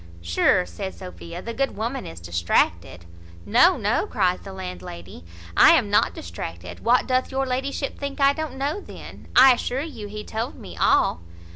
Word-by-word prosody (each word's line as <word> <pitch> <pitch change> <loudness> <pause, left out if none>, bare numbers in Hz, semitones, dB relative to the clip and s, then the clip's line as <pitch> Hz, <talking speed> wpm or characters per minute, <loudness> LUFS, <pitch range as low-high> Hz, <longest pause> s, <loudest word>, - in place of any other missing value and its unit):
"Sure," 85 - +2
says 190 0 -7
Sophia, 180 -1 -9
"the 230 - -5
good 270 +3 -2
woman 235 +5 -3
is 80 +1 -9
distracted." 85 0 0 0.4
"No, 340 - +5
no," - - 0
cries 185 - +1
the 195 - -10
landlady, 90 - -8 0.3
"I - - +8
am - - +2
not - - +3
distracted. 85 +1 -7
What, 245 +2 +3
doth 255 0 0
your 270 0 0
ladyship 270 +2 -3
think 280 0 -5
I 275 0 +5
don't 315 -2 -5
know 285 +8 -2
then? - - -12
I 260 +1 +9
assure 250 +2 -2
you 285 -9 -7
he 210 +1 -7
told 225 +3 -4
me 85 - -11
all." 80 - +2
210 Hz, 170 wpm, -23 LUFS, -, 0.4 s, I